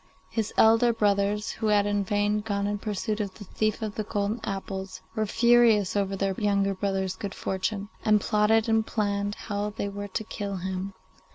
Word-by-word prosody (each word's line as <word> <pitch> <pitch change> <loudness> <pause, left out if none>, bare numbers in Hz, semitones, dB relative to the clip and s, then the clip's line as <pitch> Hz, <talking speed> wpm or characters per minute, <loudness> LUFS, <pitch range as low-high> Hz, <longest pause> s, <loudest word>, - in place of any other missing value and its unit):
His 220 -2 -1
elder 225 +2 +6
brothers, 205 -1 +1
who 220 - -3
had 205 -1 +4
in 205 -1 +1
vain 205 +1 +1
gone 200 -1 -2
in 205 0 -1
pursuit 210 +1 -2
of 200 -3 -3
the 210 - -9
thief 215 +3 -1
of 215 -2 -3
the 215 - -3
golden 205 +2 -1
apples, 195 -1 -5
were 220 -1 -1
furious 225 -4 +4
over 195 -1 0
their 195 0 0
younger 200 -1 +2
brother's 190 -1 -1
good 195 +1 -6
fortune, 195 +2 -2 0.2
and 215 -1 +4
plotted 215 +2 +2
and 225 -1 +3
planned 205 -2 -1
how 205 -1 -3
they 205 -1 -4
were 205 0 -5
to 200 +2 -3
kill 205 -2 -4
him. 190 +1 -4
205 Hz, 185 wpm, -27 LUFS, 200-215 Hz, 0.2 s, elder